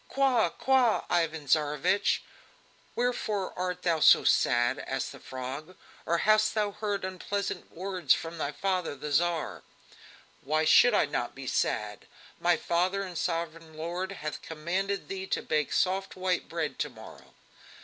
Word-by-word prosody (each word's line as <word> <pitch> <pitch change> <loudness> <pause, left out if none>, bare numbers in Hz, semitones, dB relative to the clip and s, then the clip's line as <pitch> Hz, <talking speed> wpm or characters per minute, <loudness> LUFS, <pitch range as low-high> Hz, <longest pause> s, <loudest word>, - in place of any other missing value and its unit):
"Qua! 265 -4 +2
qua! 260 -4 +2
Ivan 160 -3 0
Tsarevich! 150 +7 +2 0.7
wherefore 220 -5 -1
art 180 0 -3
thou 170 -2 +2
so - - +7
sad?" 120 +1 +3
asked 135 -1 -2
the - - -11
Frog. 135 +7 -7 0.3
"Or 170 - +2
hast 215 0 +4
thou 210 -1 +1
heard 205 -2 -3
unpleasant 190 +2 -4
words 185 -4 -3
from 165 0 +1
thy 145 - -1
father 180 0 -1
the 150 +2 -6
Tsar?" 170 +2 0 0.8
"Why 155 +3 +1
should 240 +8 +6
I - - +4
not 125 -4 -3
be 135 0 -8
sad? 105 -4 -1 0.3
My 175 0 +3
father 185 +3 0
and 185 -2 -7
sovereign 165 -1 -3
lord 175 +4 -3
hath 155 -5 -5
commanded 180 +5 -3
thee 190 0 -5
to - - -1
bake 150 -3 0
soft 190 +1 0
white 185 -1 -1
bread - - -3
to - - -1
morrow." - - -14
175 Hz, 150 wpm, -29 LUFS, 155-195 Hz, 0.8 s, so